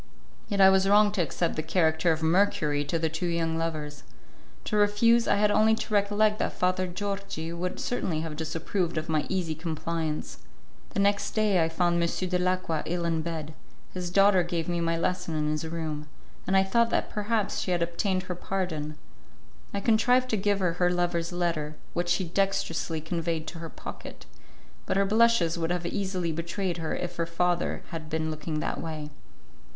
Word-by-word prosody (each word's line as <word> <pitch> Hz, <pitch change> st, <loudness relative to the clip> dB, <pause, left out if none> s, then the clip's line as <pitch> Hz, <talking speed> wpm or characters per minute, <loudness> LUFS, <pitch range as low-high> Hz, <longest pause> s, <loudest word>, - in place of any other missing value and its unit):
Yet 200 Hz, -2 st, -2 dB
I 190 Hz, 0 st, +8 dB
was 190 Hz, 0 st, +3 dB
wrong 205 Hz, 0 st, +6 dB
to 200 Hz, -3 st, 0 dB
accept 170 Hz, +2 st, -1 dB
the 155 Hz, -, -1 dB
character 160 Hz, 0 st, +2 dB
of 160 Hz, 0 st, -1 dB
Mercury 160 Hz, -4 st, +2 dB
to 165 Hz, -, 0 dB
the 160 Hz, 0 st, +1 dB
two 160 Hz, +3 st, -3 dB
young 165 Hz, -1 st, 0 dB
lovers. 155 Hz, -3 st, -3 dB, 0.6 s
To 215 Hz, -, -2 dB
refuse, 210 Hz, +3 st, +4 dB
I -, -, +4 dB
had 205 Hz, +1 st, +3 dB
only 215 Hz, +1 st, +4 dB
to 225 Hz, -, -5 dB
recollect 210 Hz, +1 st, +2 dB
that -, -, -1 dB
Father 185 Hz, 0 st, +1 dB
Georgi 195 Hz, -3 st, -4 dB
would 180 Hz, +2 st, -3 dB
certainly 175 Hz, -10 st, -1 dB
have 160 Hz, -2 st, -5 dB
disapproved 165 Hz, +2 st, -2 dB
of 155 Hz, +1 st, -3 dB
my 155 Hz, -2 st, +1 dB
easy 180 Hz, -4 st, -1 dB
compliance. 160 Hz, -1 st, -3 dB, 0.5 s
The -, -, -3 dB
next 200 Hz, +1 st, +2 dB
day 210 Hz, -5 st, +3 dB
I 160 Hz, -, 0 dB
found 170 Hz, +1 st, +1 dB
M. 170 Hz, -, +2 dB
Dalacqua 180 Hz, -3 st, 0 dB
ill 175 Hz, 0 st, -1 dB
in 165 Hz, -1 st, 0 dB
bed; 160 Hz, -2 st, -5 dB, 0.4 s
his 180 Hz, -1 st, -3 dB
daughter 195 Hz, +1 st, +5 dB
gave 170 Hz, -2 st, -2 dB
me 175 Hz, -1 st, -1 dB
my 165 Hz, 0 st, +1 dB
lesson 180 Hz, -1 st, -1 dB
in 150 Hz, 0 st, 0 dB
his 155 Hz, +1 st, -2 dB
room, 155 Hz, -2 st, -4 dB, 0.4 s
and 190 Hz, +1 st, +3 dB
I 190 Hz, -, +5 dB
thought 235 Hz, +4 st, +2 dB
that -, -, 0 dB
perhaps 210 Hz, -1 st, -1 dB
she -, -, -3 dB
had 175 Hz, -1 st, +2 dB
obtained 185 Hz, +2 st, -1 dB
her 180 Hz, -, -4 dB
pardon. 170 Hz, -5 st, -3 dB, 0.8 s
I 200 Hz, -, -2 dB
contrived 245 Hz, +4 st, +3 dB
to -, -, +3 dB
give 205 Hz, 0 st, +1 dB
her 180 Hz, -2 st, +2 dB
her 180 Hz, -, +5 dB
lover's 175 Hz, -1 st, 0 dB
letter, 165 Hz, -4 st, -1 dB, 0.2 s
which 175 Hz, 0 st, -1 dB
she 175 Hz, +2 st, +2 dB
dextrously 165 Hz, -3 st, -1 dB
conveyed 165 Hz, 0 st, -2 dB
to 170 Hz, -, -9 dB
her 165 Hz, 0 st, -6 dB
pocket, -, -, -9 dB, 0.6 s
but -, -, +1 dB
her 200 Hz, -, +3 dB
blushes 215 Hz, -5 st, +3 dB
would 165 Hz, 0 st, -1 dB
have 175 Hz, -1 st, -1 dB
easily 185 Hz, -3 st, -1 dB
betrayed 170 Hz, +2 st, -2 dB
her 160 Hz, -2 st, -2 dB
if 175 Hz, 0 st, -5 dB
her 165 Hz, -1 st, 0 dB
father 175 Hz, +1 st, 0 dB
had 160 Hz, -2 st, -6 dB
been 160 Hz, 0 st, -1 dB
looking 155 Hz, 0 st, -3 dB
that -, -, -2 dB
way. 155 Hz, -2 st, -5 dB
175 Hz, 190 wpm, -28 LUFS, 160-195 Hz, 0.8 s, I